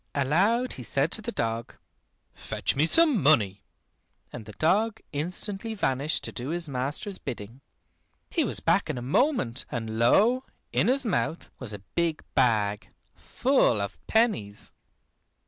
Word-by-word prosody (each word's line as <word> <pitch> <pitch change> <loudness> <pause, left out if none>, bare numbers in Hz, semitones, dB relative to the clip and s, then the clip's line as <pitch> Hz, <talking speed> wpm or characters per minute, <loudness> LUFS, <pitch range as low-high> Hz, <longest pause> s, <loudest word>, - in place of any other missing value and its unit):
Aloud 195 - +2
he 130 - -8
said 135 +6 -1
to 220 - +5
the 230 +3 -4
dog, 115 - -3 0.6
"Fetch - - -3
me 150 +4 +3
some 305 - +4
money," 105 -10 +3 0.7
and 115 -3 -8
the 105 - -10
dog 205 - +1
instantly 195 +8 -2
vanished 140 -5 0
to - - -5
do 125 +2 -5
his 170 0 -3
master's 140 +9 -1
bidding. 115 +3 -7 0.7
He - - +1
was - - +1
back - - +1
in - - -2
a 120 - -5
moment, 140 - 0
and 110 -2 -4
lo! 225 - +4 0.3
in - - +1
his 260 +1 +2
mouth 175 -5 -2
was 125 -5 -4
a 100 -2 -8
big 170 -2 -1
bag, 105 -5 +1 0.2
full 255 - +1
of 100 -1 -5
pennies. 205 - 0
145 Hz, 145 wpm, -27 LUFS, -, 0.7 s, to